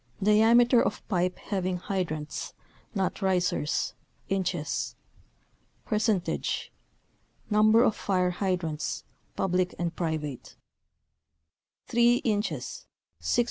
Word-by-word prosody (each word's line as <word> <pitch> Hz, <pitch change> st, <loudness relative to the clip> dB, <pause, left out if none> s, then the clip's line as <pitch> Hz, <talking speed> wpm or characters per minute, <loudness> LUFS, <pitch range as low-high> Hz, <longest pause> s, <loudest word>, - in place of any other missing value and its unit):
Diameter 230 Hz, +4 st, +6 dB
of -, -, -2 dB
pipe 180 Hz, -2 st, 0 dB
having 185 Hz, -2 st, -2 dB
hydrants 170 Hz, -5 st, -3 dB, 0.4 s
(not 195 Hz, +2 st, -1 dB
risers) 180 Hz, -5 st, +1 dB, 1.9 s
Percentage 215 Hz, -4 st, 0 dB, 0.8 s
Number 215 Hz, +2 st, +6 dB
of 220 Hz, -, +3 dB
fire 180 Hz, -2 st, +1 dB
hydrants, 175 Hz, -5 st, -2 dB, 0.3 s
public 180 Hz, -1 st, 0 dB
and 170 Hz, -1 st, -2 dB
private 155 Hz, -6 st, -3 dB, 1.4 s
Inches 235 Hz, -3 st, +1 dB, 0.5 s
3. -, -, +2 dB
190 Hz, 75 wpm, -28 LUFS, 175-215 Hz, 1.9 s, Diameter